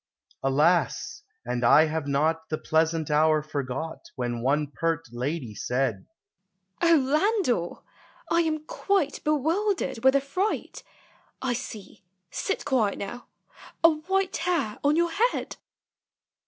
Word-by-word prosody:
Alas! 150 +2 +1 0.2
and 125 0 -2
I 150 +6 +7
have 155 -2 -3
not 155 +3 0
The 155 - -1
pleasant 160 -1 0
hour 155 0 +3
forgot, 150 +1 -4 0.2
When 120 -2 -3
one 145 +4 +2
pert 165 +1 -1
lady 125 0 -3
said, 120 -1 -2 0.2
— 190 -1 -55
" 190 0 -45
O 335 -1 +6
Landor! 290 - +1 0.4
I 335 - +3
am 310 -2 -1
quite 390 -7 -1
Bewildered 315 - 0
with 265 +1 +5
affright; 280 +10 -1 0.6
I 260 -2 -1
see 215 -5 -8 0.3
(sit 395 - -2
quiet 245 -8 +1
now 200 +5 -7 0.3
!) - - -19
a 330 - +8
white 375 +5 -1
hair 325 -12 -1
on 290 +1 +3
your 340 0 +2
head!" 460 +8 0
190 Hz, 130 wpm, -26 LUFS, -, 0.6 s, a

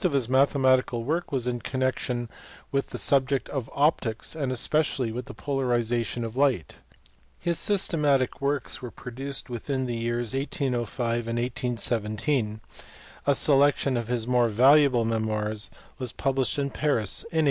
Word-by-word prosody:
443 140 - +1
mathematical 130 -3 +3
work 165 +7 -2
was 130 -4 -1
in 125 -1 -1
connection 130 -2 -2 0.4
with 140 0 0
the - - -5
subject 135 -1 +2
of 135 -5 -4
optics 140 -5 0
and 140 -5 -2
especially 135 -2 +1
the 125 +2 -6
polarization 120 -4 -1
of 115 +1 -6
light. 130 - +1 0.6
His 170 -1 -1
systematic 150 -11 +1
works 140 -1 -2
were 125 - -5
produced 135 +4 -6
within 130 +3 -2
the 120 - -3
years 120 0 -2
1805 125 - -1
and 115 0 -2
1817: 120 -1 -1 0.7
a 140 - +5
selection 140 -2 +4
of 120 -2 -2
his 120 -2 -1
more 125 -1 +3
valuable 130 +2 +5
memoirs 110 -1 -1 0.3
was 125 -3 -2
published 135 -1 0
in 140 -1 -1
Paris 120 -11 0
in 165 - -3
1858. - - +4
130 Hz, 140 wpm, -26 LUFS, 120-140 Hz, 0.7 s, a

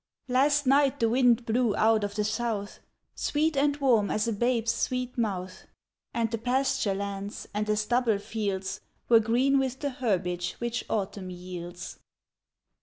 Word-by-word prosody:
AST 285 +3 +3
night 275 +1 +3
the 230 - +3
wind 245 -1 +3
blew 230 -1 +1
out 220 -1 +3
of 205 0 -3
the 210 - 0
south, 215 -1 -2 0.3
Sweet 310 +1 0
and 285 +1 +2
warm 240 -8 +3
as 215 +1 0
a 230 - 0
babe's 235 +1 +1
sweet 250 -1 -2
mouth, 190 -6 -3 0.4
And 230 -1 -1
the 230 - -2
pasture 250 -4 +1
lands 200 0 -5
and 210 +1 -1
the 210 0 +1
stubble 230 0 +1
fields. 200 -2 -3 0.3
Were 230 -1 +8
green 250 +5 +2
with 265 -1 -2
the 285 -1 -2
herbage 180 -8 -1
which 235 0 -3
Autumn 200 -2 -3
yields. 175 -1 -8
225 Hz, 155 wpm, -28 LUFS, 200-255 Hz, 0.4 s, Were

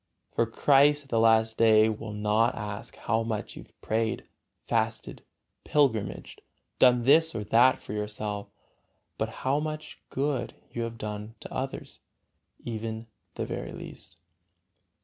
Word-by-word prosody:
For 115 - +2
Christ 145 +5 +4
at 135 - -23
the 115 - +2
last 110 0 +4
day 110 -1 +6
will 110 0 -4
not 105 +3 +2
ask 105 -1 -6
how 115 -1 0
much 115 -2 -3
you - - -8
have - - -20
prayed, 110 0 -1 0.4
fasted, - - -1 0.4
pilgrimaged, 130 -9 0 0.4
done 125 -1 +6
this 160 +5 +5
or 110 - -2
that 120 +5 +5
for - - -8
yourself, 105 -1 -3 0.7
but 110 - 0
how 130 +5 -1
much 155 0 -5
good 135 -2 -1 0.2
you 120 - -4
have 115 0 -4
done 105 +1 -6
to - - -8
others, 135 +1 -5 0.7
even 110 -1 -4 0.3
the - - -2
very - - -5
least. - - -10
115 Hz, 140 wpm, -28 LUFS, 110-130 Hz, 0.7 s, day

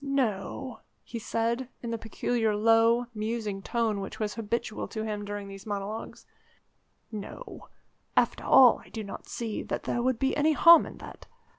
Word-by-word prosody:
"No," 260 -2 -2 0.2
he 235 - -6
said 230 +3 -1
in 235 - -3
the 230 - -1
peculiar 225 0 -1
low, 225 +2 +4
musing 215 -2 -3
tone 225 -1 0
which 195 - -7
was 210 -1 -1
habitual 225 -1 -3
to 220 - -5
him 210 -1 -3
during 205 0 -5
these 195 +1 -10
monologues, 205 +1 -5 0.9
"no; 215 - -8 0.5
after - - +2
all, 255 -3 +7
I - - -17
do 220 - -5
not 200 - -8
see 225 -3 -4
that - - -4
there 240 - -1
would 255 0 +1
be 270 +3 0
any 310 +2 +3
harm 335 +2 +8
in - - -10
that. - - -11
225 Hz, 165 wpm, -28 LUFS, 210-240 Hz, 0.9 s, harm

